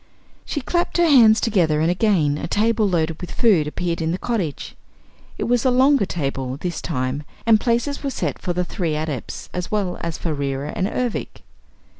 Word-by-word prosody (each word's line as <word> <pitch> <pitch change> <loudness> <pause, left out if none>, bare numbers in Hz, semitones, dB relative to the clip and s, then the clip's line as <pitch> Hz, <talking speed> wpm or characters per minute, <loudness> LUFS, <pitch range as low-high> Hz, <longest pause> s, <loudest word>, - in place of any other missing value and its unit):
She 290 - -3
clapped 345 +7 -1
her 345 - +4
hands 235 -8 +6
together 170 -9 +2
and 160 +2 +2
again 175 -7 +2
a - - -4
table 215 +2 +2
loaded 165 -2 -1
with 180 - -6
food 190 -11 +3
appeared 170 +2 -2
in 160 - 0
the 180 - -1
cottage. 190 -10 -3 0.6
It - - -2
was 245 -1 +1
a 260 - +3
longer 260 -3 +4
table, 135 -4 -3
this 175 +3 -4
time, 130 -2 -2 0.2
and 225 -1 +5
places 240 +4 0
were 280 - -2
set - - -3
for 180 - -3
the 180 +1 -1
three 170 -5 -2
Adepts 150 -5 -4
as 180 -1 -4
well 200 -4 -1
as 170 -2 -3
for 165 - -2
Reera 140 0 -3
and 185 - 0
Ervic. 245 +1 -3
180 Hz, 190 wpm, -21 LUFS, 155-230 Hz, 0.6 s, hands